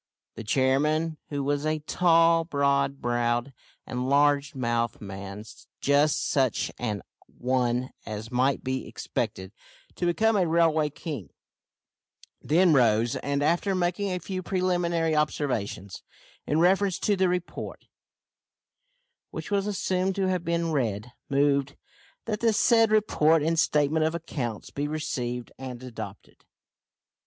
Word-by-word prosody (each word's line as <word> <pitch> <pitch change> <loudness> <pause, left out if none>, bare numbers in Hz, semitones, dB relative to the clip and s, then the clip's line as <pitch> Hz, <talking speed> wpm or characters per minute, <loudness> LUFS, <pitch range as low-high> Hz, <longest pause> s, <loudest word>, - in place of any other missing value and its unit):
The 115 - -8
chairman, 150 +7 +1
who 145 -1 -2
was 145 +1 0
a 155 0 0
tall, 165 +1 +3
broad 140 -3 0
browed, 120 +2 0 0.3
and 125 +1 -3
large 145 0 +3
mouthed 120 -3 -1
man, 100 +1 -7 0.4
just 145 +2 +2
such 130 -4 +1
an 105 -4 -3 0.2
one 125 0 -1
as 110 +1 -6
might 130 +2 +1
be 130 0 -3
expected 95 0 -4 0.4
to 175 - -2
become 220 +6 +2
a 185 -4 +2
railway 160 -2 +3
king, 140 - -7 1.1
then 170 +2 +4
rose, 115 -3 +3
and, 140 0 -1
after 175 +5 +1
making 180 +2 0
a 180 - -1
few 185 +2 -5
preliminary 175 -3 0
observations 125 -10 -2 0.5
in 150 - +1
reference 190 +2 +3
to 205 - +1
the 190 -1 +2
report, 180 -1 -4 1.4
which - - -7
was 200 0 +1
assumed 190 -1 0
to 195 -1 0
have 185 -2 0
been 170 -1 -1
read, 115 -5 -1 0.2
moved, 140 0 +2 0.5
"that 215 -2 -2
the 230 -1 +2
said 225 +1 +4
report 165 -7 +3
and 165 +1 +1
statement 150 0 +2
of 160 +1 0
accounts 120 -9 -5
be 145 +1 -2
received 125 -6 -3
and 130 -2 -7
adopted." 125 -3 -9
145 Hz, 130 wpm, -27 LUFS, 125-170 Hz, 1.4 s, then